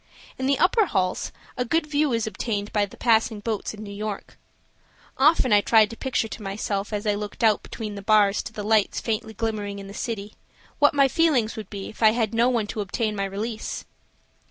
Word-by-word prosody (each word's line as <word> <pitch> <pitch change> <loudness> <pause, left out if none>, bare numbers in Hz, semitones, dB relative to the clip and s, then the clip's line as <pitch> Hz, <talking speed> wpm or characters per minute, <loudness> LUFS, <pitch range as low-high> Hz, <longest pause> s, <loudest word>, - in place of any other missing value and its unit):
In 260 - 0
the 275 0 +3
upper 400 +3 +3
halls 185 - -1 0.2
a 250 - 0
good 325 +6 +1
view 300 -1 +1
is 230 -1 0
obtained 210 -1 -3
of 205 -1 +1
the - - -14
passing 225 -2 +2
boats 215 0 -3
and 215 - -9
New 200 -1 -8
York. 210 0 -5 0.8
Often 270 -4 +4
I 205 - +6
tried 220 0 +4
to - - -7
picture 250 -2 -1
to 220 - -8
myself 200 +1 -3
as 210 0 -3
I 210 - +2
looked 205 +2 -5
out 220 -2 +4
between 215 -3 -6
the 200 - -7
bars 205 0 +4
to - - -8
the 215 -2 -6
lights 215 -1 +2
faintly 220 -1 -3
glimmering 210 -2 -3
in 200 - -8
the 195 - -9
city, 210 -1 -4 0.5
what 290 0 +5
my 275 -1 +5
feelings 270 -6 +2
would 215 -3 -7
be 200 -2 -6
if 215 - -12
I 220 -1 +6
had 225 -2 0
no 235 +2 +3
one 235 -4 +1
to 210 +1 -4
obtain 210 +2 -2
my 200 -1 -1
release. 215 +3 -4
215 Hz, 215 wpm, -24 LUFS, 205-235 Hz, 0.8 s, I